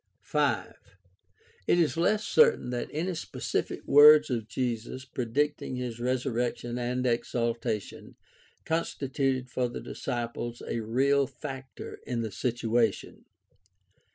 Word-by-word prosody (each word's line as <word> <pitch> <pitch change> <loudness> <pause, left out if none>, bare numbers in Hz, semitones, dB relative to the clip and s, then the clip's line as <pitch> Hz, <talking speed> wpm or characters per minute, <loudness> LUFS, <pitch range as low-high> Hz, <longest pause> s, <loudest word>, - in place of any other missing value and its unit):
5. 140 -10 0 0.9
It - - +4
is 170 -2 +2
less 210 +6 +2
certain 465 - +4
that 120 -1 -3
any 175 +5 -2
specific 165 - -3
words 150 0 +8
of 115 -3 -2
Jesus 120 +2 -3
pre 130 -2 -4
dicting 145 +2 -1
his 120 -2 -4
resurrection 120 -1 -1
and 125 +1 -1
exaltation 115 -3 -2 0.5
constituted 135 -5 -1
for 125 -1 0
the 120 - -6
disciples 120 -1 -4
a - - -2
real 135 +5 +2
factor 135 0 -8
in 120 -2 -1
the 110 -2 -3
situation. 115 -3 -1
125 Hz, 115 wpm, -28 LUFS, 120-140 Hz, 0.9 s, words